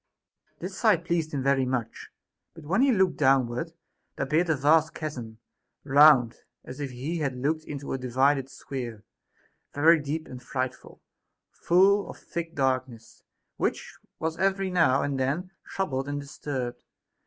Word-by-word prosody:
This 185 +3 -7
sight 195 -7 +3
pleased 165 -2 -1
him 140 -3 -2
very 140 -1 +2
much; 125 -3 -3 0.5
but 165 - -12
when 185 +10 +1
he 275 0 +5
looked 190 -6 +2
downward, 135 +2 +2 0.4
there 135 - -2
appeared 160 +5 +1
a 160 - +3
vast 155 +3 +3
chasm, 125 -8 -6 0.5
round, 140 -4 +6 0.3
as 130 +3 -9
if 140 -2 -3
he 135 +7 -4
had 140 -4 -2
looked 155 +5 -1
into 140 -1 -6
a 135 - -2
divided 130 +2 +1
sphere, 120 -7 -7 0.7
very 160 +3 +5
deep 150 +2 -4
and 125 -1 -9
frightful, 130 0 -5 0.5
full 195 +3 +3
of - - -9
thick 170 -1 -6
darkness, 130 -4 -2 0.4
which - - -2 0.2
was 160 +1 -3
every 195 0 +1
now 165 -7 +3
and 140 -2 -2
then 150 +8 -1 0.2
troubled 135 -8 -2
and 145 0 -2
disturbed. 130 -4 -5
145 Hz, 150 wpm, -27 LUFS, 130-165 Hz, 0.7 s, round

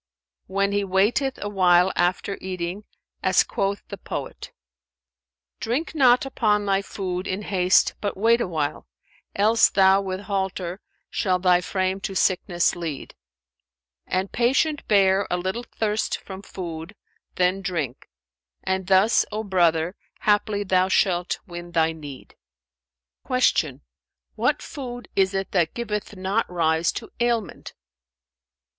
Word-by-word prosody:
"When 200 +1 0
he 205 0 +1
waiteth 205 +8 +1
awhile 185 -3 +4
after 180 +3 0
eating, 185 +2 -4 0.4
as - - +4
quoth 200 0 -2
the - - -7
poet, - - -6 1.1
'Drink 260 +11 -2
not 255 -4 +4
upon 210 -6 +1
thy 195 -1 +2
food 185 -2 -4
in 190 +3 -3
haste 185 -2 +3
but 205 -3 -3
wait 230 +4 +3
awhile; 155 - -2 0.3
* - - -35
Else 220 +3 +4
thou 195 0 +4
with 190 0 -4
halter 190 -2 -3 0.3
shalt 185 -2 0
thy 180 -1 +5
frame 190 +1 -1
to 195 0 -5
sickness 180 -2 +1
lead: 165 -5 -6 0.9
And 190 +1 -1
patient 275 +5 +1
bear 195 -1 +3
a 180 - 0
little 190 +7 -3
thirst 215 -1 -1
from 190 -1 -9
food, 170 -1 -7 0.4
then 185 +2 +1
drink; 160 -9 -4 0.3
* - - -55
And 190 -1 -1
thus, 195 +4 +4
O 215 +1 -3
brother, 175 -3 +2 0.3
haply 205 0 +1
thou 185 -1 +2
shalt 180 -2 +1
win 175 -1 -9
thy 165 -1 +3
need.[FN#403]'" 65 - -4
Q - - -1 0.5
"What - - 0
food 245 -4 -7
is 190 0 +2
it 195 0 -2
that 175 -4 +1
giveth 210 -3 -4
not 190 +4 -1
rise 165 -1 +1
to - - -7
ailments?" 235 -6 -1
190 Hz, 130 wpm, -24 LUFS, 175-205 Hz, 1.1 s, thy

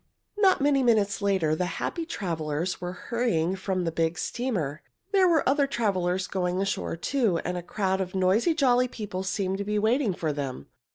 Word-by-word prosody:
Not 390 -7 +4
many 280 -1 +3
minutes 215 -5 +2
later 190 -6 +2
the 180 +3 -1
happy 335 -2 -3
travelers 165 - -3
were 175 0 -3
hurrying 185 -4 -1
from 190 -1 -2
the 165 - -1
big 165 +1 0
steamer. 185 - -2 0.3
There 385 -2 +5
were 325 -4 +3
other 280 +1 +3
travelers 190 -7 0
going 180 -1 -1
ashore, 195 -3 -1
too, 225 -2 +1
and 180 - -2
a 175 - -3
crowd 190 +1 -1
of 185 0 -4
noisy, 195 - +3
jolly 255 -4 +3
people 210 -6 -5
seemed 190 0 -2
to - - -1
be 210 +1 -1
waiting 220 -1 +2
for 155 -3 -2
them. 140 -3 -5
195 Hz, 180 wpm, -27 LUFS, 180-245 Hz, 0.3 s, There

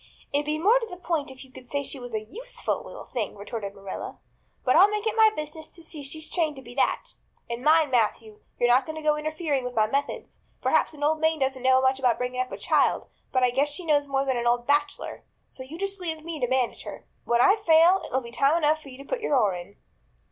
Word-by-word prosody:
"It'd 290 +1 0
be 305 0 0
more 420 +10 +4
to 460 - -5
the 360 - -8
point 330 -5 -2
if 265 0 -10
you 260 - -20
could 250 - -13
say 285 0 -1
she 275 - -5
was 245 -1 -8
a 215 - -2
useful - - -4
little - - -10
thing," 230 -5 -4
retorted 200 0 -6
Marilla, 195 -1 -7 0.5
"but 255 - +4
I'll 380 +5 +7
make 420 +1 -2
it 440 0 0
my 440 -1 +7
business 310 -5 -6
to 335 - -16
see 320 -2 -7
she's 310 +3 -4
trained 320 -4 -1
to 265 - -10
be 240 - -11
that. 280 - 0 0.4
And 235 +1 -5
mind, 310 -1 +4
Matthew, 220 -2 0 0.2
you're 240 - +3
not 250 +2 +4
to 315 0 -5
go 300 0 +3
interfering 300 -2 -2
with 250 0 -5
my 215 - +4
methods. 280 +6 -3 0.2
Perhaps - - +1
an 290 - -7
old 310 +1 +2
maid 320 0 +1
doesn't 265 -1 0
know 260 0 +5
much 260 0 +2
about 250 -3 +2
bringing 250 0 -2
up 255 - -4
a - - -5
child, - - +1 0.2
but 255 -1 +2
I 250 - +4
guess 275 +4 +1
she 340 +5 -6
knows 290 -2 +2
more 275 0 0
than 265 -2 0
an 240 0 -1
old 240 0 +2
bachelor. 290 +1 -1 0.3
So - - -12
you 275 +5 -8
just 395 +1 -3
leave 320 -3 -4
me 330 -2 -5
to 250 - 0
manage 260 -1 0
her. - - -9 0.2
When 235 0 +2
I 390 - +6
fail 345 -1 +5
it'll 260 - -1
be 235 -1 -10
time 275 +6 +3
enough 310 -1 +2
to 275 -1 -11
put - - -2
your 300 - +1
oar 210 -6 +3
in." 180 +3 -8
285 Hz, 250 wpm, -26 LUFS, 250-320 Hz, 0.5 s, I'll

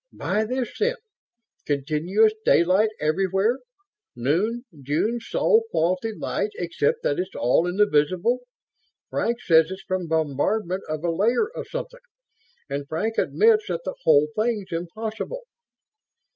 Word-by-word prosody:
"Buy 215 +1 -1
this, 250 +1 -3
then. 485 +3 +2 0.7
Continuous 160 +10 +2
daylight 185 +6 +4
everywhere. 190 - +1 0.6
Noon 190 - 0 0.2
June 160 - 0
Sol 445 - +2
quality 185 - 0
light 210 0 -2
except 170 -4 -1
that 145 - 0
it's 185 +1 -4
all 125 +8 +2
in 180 - -2
the 210 - +6
visible. 185 +9 +1 0.7
Frank 235 +1 0
says 160 -1 +5
it's 190 +1 -7
from 185 -2 -2
bombardment 160 +5 0
of 155 0 -3
a 170 - +1
layer 230 - +2
of - - -7
something, - - -6 0.7
and 140 0 -4
Frank 220 +10 -1
admits 440 -1 +3
that - - -2
the - - -3
whole 145 - +5
thing's 215 -4 -1
impossible." 220 - -5
190 Hz, 130 wpm, -24 LUFS, 160-225 Hz, 0.7 s, the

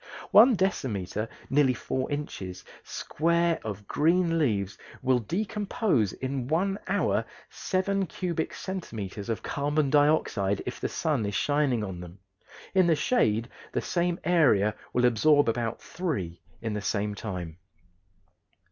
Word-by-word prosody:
One 235 +3 +8
decimeter 110 - -1 0.2
(nearly 135 -2 +4
4 130 +2 -3
inches) 95 -11 -5 0.2
square 170 +1 0
of 105 -2 -6
green 165 +1 +2
leaves 100 -9 0 0.3
will 130 -1 +3
decompose 195 - 0
in 130 -1 -3
one 195 +7 0
hour - - +1 0.3
seven 195 0 -1
cubic 170 -3 -2
centimeters 110 - -5
of 115 - -2
carbon 145 0 0
dioxide, 145 -10 +2
if - - -5
the - - -2
sun 150 -8 0
is 100 - -3
shining 145 -6 +1
on 95 -3 -5
them; 90 +1 -10 0.6
in 185 -2 +4
the 165 - +4
shade 115 - +1 0.3
the - - 0
same 175 -1 0
area 130 - +4 0.2
will 125 0 +2
absorb 145 +5 +4
about 115 0 -1
three 95 - -4 0.2
in 110 -2 -2
the 105 - -2
same 105 +1 -1
time. 90 -5 -6
135 Hz, 130 wpm, -28 LUFS, 105-170 Hz, 0.6 s, One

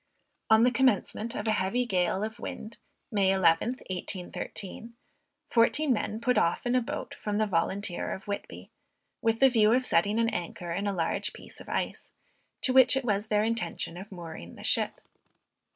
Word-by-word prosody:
On 220 +1 +6
the 250 - +5
commencement 235 -2 +1
of 210 - -3
a - - +3
heavy 215 +5 0
gale 190 -2 0
of 220 0 -5
wind, 220 +2 -7 0.3
May 200 -3 +2
11th, 190 +6 +2
1813, 190 +4 -4 0.6
fourteen 260 +4 +3
men 215 -1 -2
put 250 +2 +2
off 170 +7 0
in 245 - +1
a 255 - +3
boat 230 - -5
from 205 -1 -3
the 215 - +2
Volunteer 190 0 -1
of 190 - -5
Whitby, 200 0 -6 0.5
with 225 0 +1
the 270 - +7
view 220 -3 +4
of 255 +1 +2
setting 205 +4 +2
an 230 0 +2
anchor 175 -3 -5
in 200 +4 -2
a - - +1
large 165 -4 -1
piece - - -12
of - - -12
ice, - - -3 0.5
to 255 - +2
which 260 0 +7
it 270 - -2
was 210 -1 0
their 210 -1 +2
intention 220 -7 -2
of 190 +4 -9
mooring 165 - -9
the - - -11
ship. - - 0
215 Hz, 180 wpm, -28 LUFS, 190-235 Hz, 0.6 s, the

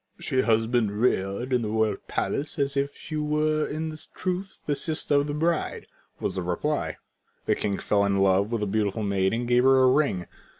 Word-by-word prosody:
"She 130 - +1
has 115 -2 +2
been 115 -2 +1
reared 120 +1 0
in 125 - +3
the 110 - -2
royal 110 -2 +1
palace 145 +4 -2
as 140 -1 0
if 140 +1 -1
she 155 - -5
were 150 0 +1
in 155 +1 -4 0.2
truth 185 +1 -4
the 145 - +1
sister 155 +1 -1
of 145 0 +3
the 145 - -3
bride," 165 +1 -1 0.3
was - - -2
the 95 - -2
reply. 90 - -2 0.5
The - - +3
king 100 -1 -1
fell 100 -1 +1
in 100 -1 +1
love 95 +2 +3
with 115 -2 -1
the - - +1
beautiful 105 +1 -1
maid 95 -2 +1
and 120 +1 -2
gave 120 0 +4
her 135 0 +6
a 130 - +6
ring. 130 -11 +1
125 Hz, 205 wpm, -26 LUFS, 105-150 Hz, 0.5 s, her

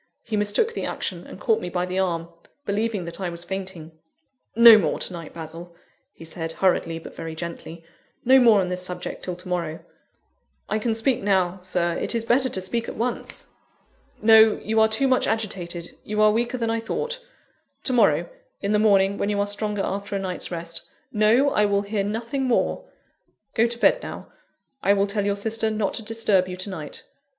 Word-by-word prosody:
He 225 - -3
mistook 210 - +1
the - - -4
action, - - -4
and - - -10
caught 450 - +1
me - - -4
by 180 +1 -1
the 185 +1 -2
arm, 170 -3 -1 0.4
believing 205 -2 -1
that 170 +3 -6
I 185 - -1
was 170 0 -8
fainting. 185 -4 -6 0.6
"No 235 0 +10
more 160 -6 0
to - - -4
night, 165 -2 -8
Basil," 165 +1 -9 0.4
he 165 - -13
said, 165 0 -5
hurriedly, 175 -3 +1
but 165 - -10
very 165 -1 -6
gently; 170 0 -7 0.4
"no 265 +2 +7
more 230 -5 +6
on 180 - -2
this 180 0 -3
subject 180 -1 -5
till 180 - -3
to 180 +1 -12
morrow." 170 -3 -3 0.8
"I 215 - 0
can 225 0 0
speak 250 +3 +1
now, 190 -2 +1
Sir; 175 -2 -1
it - - -2
is 230 -1 -1
better 255 +3 +2
to 190 - -1
speak 230 +5 -2
at - - -7
once." 240 +2 -4 0.7
"No: 220 0 +6
you 220 +1 +1
are 220 - +6
too 220 +5 +1
much 255 -1 +2
agitated; 180 -6 -3
you 210 0 -3
are 215 0 +6
weaker 240 +3 -1
than 230 -2 -1
I 230 - 0
thought. 475 - -4 0.6
To 260 - 0
morrow, 245 - +3 0.3
in 200 - -2
the 210 - +3
morning, 200 -2 +3
when 200 - 0
you 205 -1 0
are 200 - +2
stronger 205 0 -2
after 200 +1 -3
a - - 0
night's 185 -2 -3
rest. 170 -1 -5 0.3
No! 230 +6 +4
I 210 - +3
will 200 0 +1
hear 200 0 -1
nothing 230 +6 -2
more. 250 - 0 0.7
Go 230 0 +3
to 235 0 -3
bed - - +3
now; - - -8 0.5
I 200 - +4
will 200 0 +2
tell 205 0 -1
your 200 0 +1
sister 220 +2 0
not 215 -2 -1
to - - -3
disturb 215 -4 +1
you 180 0 -6
to 185 +2 -4
night. 155 -5 -7
200 Hz, 200 wpm, -24 LUFS, 180-225 Hz, 0.8 s, No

